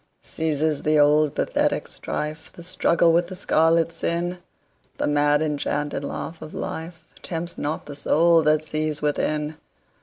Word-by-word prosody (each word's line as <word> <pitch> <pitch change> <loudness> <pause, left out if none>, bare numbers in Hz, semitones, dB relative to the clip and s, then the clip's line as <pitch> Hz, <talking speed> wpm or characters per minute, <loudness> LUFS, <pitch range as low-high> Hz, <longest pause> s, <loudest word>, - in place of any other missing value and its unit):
Ceases 155 -1 -1
the 155 0 +2
old 150 0 +4
pathetic - - 0
strife, 155 +1 -5
The 170 - -11
struggle 170 -1 +2
with 170 +1 +2
the 185 - -7
scarlet 165 -2 +2
sin:The 175 +2 -5
mad 145 +1 +3
enchanted 145 -1 -2
laugh 160 +3 -5
of 155 - -9
lifeTempts 165 +1 -5
not 150 +2 -3
the 145 - -8
soul 165 +4 +4
that 155 0 +2
sees 155 -1 -2
within. 150 +1 -1
155 Hz, 130 wpm, -24 LUFS, 150-165 Hz, -, old